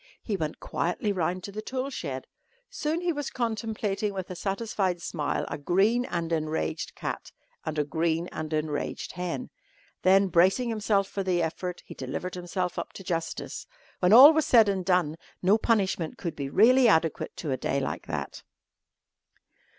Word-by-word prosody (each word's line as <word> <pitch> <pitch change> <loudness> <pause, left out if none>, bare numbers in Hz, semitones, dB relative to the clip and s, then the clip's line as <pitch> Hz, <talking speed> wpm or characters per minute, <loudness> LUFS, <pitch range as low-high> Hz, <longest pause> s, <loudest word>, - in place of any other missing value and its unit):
He 215 - -2
went 155 -4 -3
quietly 180 +5 -1
round 180 -1 -1
to 200 - -6
the 215 +2 -5
tool 260 +4 -3
shed. 135 - -5 0.5
Soon 315 +3 -1
he 350 -1 0
was 290 -2 -3
contemplating 215 -3 -2
with 185 -1 -5
a - - -5
satisfied 195 -2 -1
smile 155 -3 -2
a 145 - -5
green 200 +11 +2
and 170 -4 -2
enraged 155 - -2
cat - - -5 0.4
and 155 0 -2
a 150 - +3
green 165 +3 0
and 155 0 -5
enraged 155 -1 -2
hen. 180 +7 -4 0.5
Then, 195 +1 +5
bracing 190 +8 +3
himself 210 -3 +1
for 195 - -4
the 180 -2 +1
effort, 175 +2 -4
he - - -9
delivered 180 0 -5
himself 180 0 -3
up - - -6
to 195 - -9
justice. 165 -3 -4 0.3
When 180 0 +3
all 270 +8 +11
was 315 -1 +1
said 225 -4 +6
and 195 -2 0
done 175 -4 +1 0.3
no 200 +5 +4
punishment 195 -8 0
could 170 -4 -4
be 140 -2 -4
really 245 - +6
adequate 160 -6 +1
to 150 - -3
a - - +2
day 140 - -1
like 135 - -4
that. - - -4
185 Hz, 170 wpm, -27 LUFS, 165-215 Hz, 0.5 s, all